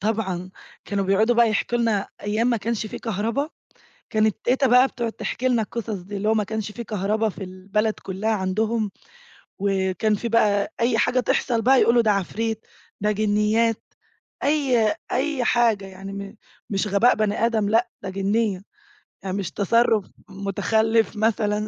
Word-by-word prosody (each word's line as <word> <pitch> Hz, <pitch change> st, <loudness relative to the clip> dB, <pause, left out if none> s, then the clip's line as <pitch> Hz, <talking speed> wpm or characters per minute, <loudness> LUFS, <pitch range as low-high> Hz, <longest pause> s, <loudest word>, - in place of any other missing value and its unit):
طبعًا. 190 Hz, -4 st, -2 dB, 0.3 s
كانوا 200 Hz, -1 st, -1 dB
بيقعُدوا 215 Hz, +5 st, +3 dB
بقى 235 Hz, -1 st, +5 dB
يحكُوا 240 Hz, +3 st, 0 dB
لنا 220 Hz, -4 st, 0 dB
أيام 215 Hz, +3 st, 0 dB
ما 235 Hz, -, +2 dB
كانش 220 Hz, 0 st, -2 dB
في -, -, -7 dB
كهربا. 230 Hz, +6 st, -2 dB, 0.6 s
كانت 215 Hz, -1 st, +2 dB
تيتة 265 Hz, +2 st, +2 dB
بقى 250 Hz, +2 st, +6 dB
بتقعُد 235 Hz, -3 st, -4 dB
تحكي 255 Hz, -, -3 dB
لنا 240 Hz, -3 st, +2 dB
القِصص 225 Hz, +2 st, -5 dB
دي. 200 Hz, +3 st, -7 dB
اللي 210 Hz, +2 st, 0 dB
هو -, -, +4 dB
ما 215 Hz, -1 st, +1 dB
كانش 215 Hz, +1 st, -4 dB
في 235 Hz, +2 st, -7 dB
كهربا 215 Hz, +1 st, 0 dB
في 195 Hz, -, -8 dB
البلد 195 Hz, +4 st, -1 dB
كلّها 195 Hz, +3 st, -3 dB
عندهم 215 Hz, +2 st, 0 dB, 0.7 s
وكان 195 Hz, +2 st, +1 dB
في 235 Hz, -, -4 dB
بقى 210 Hz, -3 st, +2 dB
أي 230 Hz, -1 st, +2 dB
حاجة 255 Hz, -, +2 dB
تحصَل 240 Hz, -1 st, +1 dB
بقى، 260 Hz, +3 st, +5 dB
يقولوا 235 Hz, +1 st, +5 dB
ده 220 Hz, -2 st, +3 dB
عفريت، 220 Hz, +3 st, -2 dB, 0.4 s
ده 210 Hz, +1 st, +2 dB
جِنيّات. 215 Hz, +2 st, +1 dB, 0.6 s
أي 260 Hz, -8 st, +2 dB, 0.2 s
أي 270 Hz, 0 st, 0 dB
حاجة 230 Hz, -5 st, +2 dB
يعني 195 Hz, +1 st, -9 dB
م 200 Hz, +2 st, -7 dB, 0.3 s
مش 195 Hz, +1 st, 0 dB
غباء 205 Hz, +5 st, +4 dB
بني 215 Hz, +1 st, +1 dB
آدم، 220 Hz, -3 st, 0 dB
لأ، 235 Hz, +2 st, +2 dB
ده 190 Hz, -, -4 dB
جِنيّة، 195 Hz, 0 st, 0 dB, 0.6 s
آآ 190 Hz, -, -2 dB
مش 195 Hz, -2 st, -3 dB
تصرُّف 220 Hz, 0 st, +2 dB, 0.2 s
مُتخلِّف 220 Hz, +3 st, +1 dB
مثلًا 210 Hz, -1 st, 0 dB
215 Hz, 160 wpm, -23 LUFS, 200-230 Hz, 0.7 s, بقى